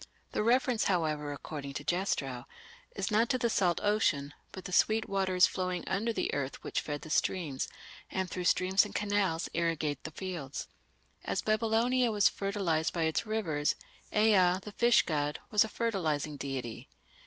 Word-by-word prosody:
The - - 0
reference, 245 0 +2
however, 155 -5 0
according 145 -1 -6
to - - -5
Jastrow, 140 -9 -1 0.5
"is - - -2
not 225 +2 +3
to 255 - +2
the 235 -2 0
salt 175 -5 +2
ocean, 205 -10 +1 0.2
but 185 - -9
the - - -6
sweet 220 +4 +3
waters 190 -2 +3
flowing 180 -2 -2
under 205 +5 0
the - - -2
earth 140 -1 -3
which - - -1
feed 145 -1 -4
the 155 - -8
streams, 155 -6 0 0.4
and 190 -1 -2
through 180 0 -4
streams 185 +2 +4
and 210 - -8
canals 200 -5 0
irrigate 160 -4 -1
the - - -5
fields". 160 -5 -5 0.6
As - - -2
Babylonia 230 +3 +2
was 205 -2 +4
fertilized 195 -6 -1
by 170 - 0
its 160 +7 0
rivers, 165 -10 0 0.4
Ea, 195 -4 +4
the 210 - -8
fish 240 -1 +5
god, 150 -2 -1
was 210 - +5
a - - -4
fertilizing 160 -11 -1
deity. 135 -5 -5
185 Hz, 165 wpm, -31 LUFS, 155-210 Hz, 0.6 s, fish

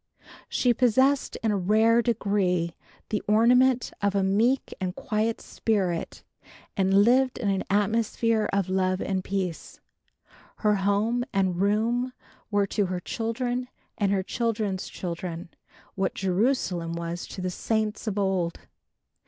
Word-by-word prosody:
She 245 -2 +2
possessed 260 +3 +2
in 220 - +2
a 205 - +1
rare 220 +5 +4
degree 200 -7 0 0.3
the 210 - -1
ornament 245 +4 +4
of 200 0 +1
a 195 - +2
meek 225 +7 +1
and 180 -1 -2
quiet 220 0 -1
spirit 190 -7 -2 0.5
and 195 +1 +4
lived 255 +2 +3
in 215 -5 -1
an 195 -1 0
atmosphere 220 +2 +1
of 195 -2 0
love 185 0 +1
and 190 -2 -2
peace. 185 -4 -4 0.8
Her 210 -2 +2
home 205 +5 +1
and 185 -2 0
room 230 +5 +1 0.4
were 205 -1 +2
to 200 0 0
her 180 0 -3
children 245 +5 -2 0.3
and 200 -3 0
her 195 -1 +1
children's 210 -3 -2
children 170 -1 -5 0.4
what 190 -1 -1
Jerusalem 185 -3 0
was 170 +1 -4
to - - -8
the 185 0 -2
saints 220 +3 -2
of 210 -1 -2
old. 190 -4 0
205 Hz, 135 wpm, -26 LUFS, 190-230 Hz, 0.8 s, rare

